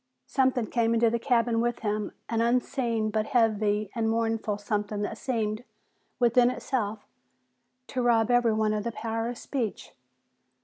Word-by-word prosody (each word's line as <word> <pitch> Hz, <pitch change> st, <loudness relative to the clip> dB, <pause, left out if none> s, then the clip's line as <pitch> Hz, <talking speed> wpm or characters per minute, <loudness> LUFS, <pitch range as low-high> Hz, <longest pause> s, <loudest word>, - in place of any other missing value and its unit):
Something 260 Hz, -3 st, +1 dB
came 230 Hz, +1 st, +1 dB
into 230 Hz, 0 st, +3 dB
the 235 Hz, -, 0 dB
cabin 230 Hz, -2 st, +2 dB
with 240 Hz, 0 st, -1 dB
him, 210 Hz, -1 st, -2 dB, 0.2 s
an 230 Hz, -1 st, 0 dB
unseen 235 Hz, -2 st, 0 dB
but 215 Hz, 0 st, 0 dB
heavy 215 Hz, -3 st, +1 dB
and 225 Hz, -1 st, 0 dB
mournful 225 Hz, -2 st, 0 dB
something 210 Hz, 0 st, -2 dB
that 205 Hz, -, -3 dB
seemed, 225 Hz, -2 st, -2 dB, 0.5 s
within 240 Hz, 0 st, +4 dB
itself, 220 Hz, -5 st, -3 dB, 0.8 s
to 255 Hz, -, -2 dB
rob 235 Hz, -1 st, +3 dB
everyone 220 Hz, -3 st, +3 dB
of 210 Hz, -1 st, -1 dB
the 235 Hz, -, -2 dB
power 225 Hz, +1 st, -3 dB
of 245 Hz, -, -5 dB
speech. 240 Hz, -7 st, -4 dB
225 Hz, 145 wpm, -27 LUFS, 215-240 Hz, 0.8 s, within